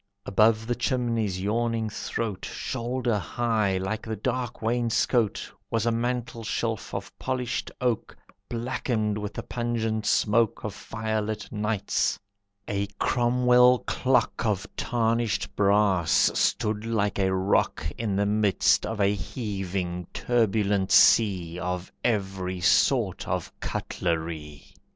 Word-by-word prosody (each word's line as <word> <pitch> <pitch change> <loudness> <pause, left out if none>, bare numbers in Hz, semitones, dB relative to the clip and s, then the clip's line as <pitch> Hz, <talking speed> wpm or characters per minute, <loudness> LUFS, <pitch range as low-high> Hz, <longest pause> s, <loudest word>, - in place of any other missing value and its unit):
Above 110 +2 +3
the 120 - 0
chimney's 115 -6 -1
yawning 115 +3 0
throat, 110 -1 -4
Shoulder 120 -2 -2
high, 110 -2 0
like 95 +4 -2
the 110 -1 -4
dark 125 +2 -3
wainscote, 115 -1 +1 0.2
Was 115 -1 0
a 120 - +3
mantelshelf 115 -2 -2
of 100 0 -6
polished 130 -1 -2
oak 125 -3 -1 0.3
Blackened 115 -3 -1
with 105 0 -5
the - - -4
pungent 115 -3 -2
smoke 110 0 +2
Of 105 - -3
firelit 110 0 -3
nights; 105 -1 0 0.5
a 100 0 -1
Cromwell 125 0 +4
clock 125 -3 +1
Of 105 -4 0
tarnished 115 -1 0
brass 100 -4 +3
stood 105 0 0
like 105 -3 0
a 95 -1 +2
rock 95 -4 +1
In 110 -4 -2
the 100 +1 +2
midst 105 -2 +2
of 115 -1 -4
a 100 0 +3
heaving, 95 -5 -4
turbulent 105 -4 +1
sea 90 -6 +5
Of 90 0 -3
every 95 -5 -1
sort 90 - +2
of - - -3
cutlery. 80 -4 -4
110 Hz, 115 wpm, -26 LUFS, 100-115 Hz, 0.5 s, sea